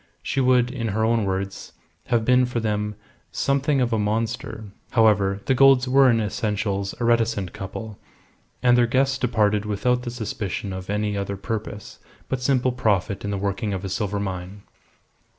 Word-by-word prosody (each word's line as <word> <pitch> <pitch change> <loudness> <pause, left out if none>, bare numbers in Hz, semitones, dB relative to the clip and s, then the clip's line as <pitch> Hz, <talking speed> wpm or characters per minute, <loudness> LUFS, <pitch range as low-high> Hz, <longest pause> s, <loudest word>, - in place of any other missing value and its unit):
She 135 - -1
would 125 -1 +3
in 120 -3 -3
her 110 +1 0
own 115 -2 +2
words 95 0 -4 0.3
have 120 -3 +1
been 125 +1 +4
for 120 -1 -2
them 105 -1 -2 0.4
"something 140 +1 +1
of 120 -2 +1
a 110 - +1
monster." 110 +1 -2 0.3
However, 100 -4 +3
the 135 - +2
Goulds 135 0 +5
were 135 +1 +5
in 115 -2 +3
essentials 105 -2 -2
a - - -2
reticent 115 -5 +1
couple, 100 +2 -7 0.6
and 125 -1 +5
their 120 -1 +4
guests 135 +2 +1
departed 105 -4 +1
without 110 +4 0
the 125 - -5
suspicion 105 -4 -4
of 95 0 -7
any 105 0 -1
other 100 0 -3
purpose 105 -1 -6 0.3
but 130 -1 -2
simple 130 -1 +2
profit 105 -5 0
in 100 - -3
the 100 - -1
working 100 +1 -2
of 95 +1 -5
a - - -3
silver 100 +1 -2
mine. 95 0 -5
110 Hz, 170 wpm, -23 LUFS, 100-125 Hz, 0.6 s, Goulds